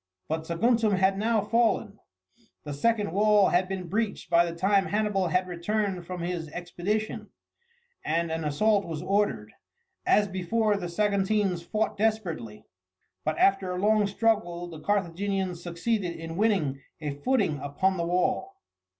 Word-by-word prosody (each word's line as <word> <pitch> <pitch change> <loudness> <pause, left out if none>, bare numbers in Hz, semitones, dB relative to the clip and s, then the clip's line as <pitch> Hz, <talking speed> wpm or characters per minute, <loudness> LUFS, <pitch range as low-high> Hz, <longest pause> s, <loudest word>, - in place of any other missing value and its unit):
But 160 0 -3
Saguntum 225 +5 +2
had 190 0 +3
now 220 +2 +1
fallen. 220 -1 +1 0.6
The 145 - -5
second 210 +5 +1
wall 205 +1 +4
had 180 +1 +2
been 190 -2 -4
breached 210 +1 -2
by 170 0 +6
the 170 - -7
time 195 +2 +2
Hannibal 205 -3 0
had 180 +2 +1
returned 185 0 -2
from 180 -1 -5
his 170 -2 -3
expedition, 175 +6 -3 0.7
and 165 +1 0
an 160 0 -2
assault 200 +8 +2
was 160 -2 -5
ordered. 205 +2 0 0.5
As 205 -1 +3
before, 205 +3 0
the 180 -3 -4
Saguntines 200 -1 +1
fought 215 +5 -1
desperately, 175 - -2 0.6
but 155 0 -1
after 195 -1 +3
a - - -3
long 210 +1 +3
struggle 200 -5 0
the 165 -3 -9
Carthaginians 190 0 -1
succeeded 175 +1 -2
in 165 0 -7
winning 180 -10 +1 0.2
a 150 -2 -3
footing 155 - 0
upon 185 +8 0
the 170 0 -1
wall. 180 - 0
190 Hz, 145 wpm, -27 LUFS, 170-210 Hz, 0.7 s, by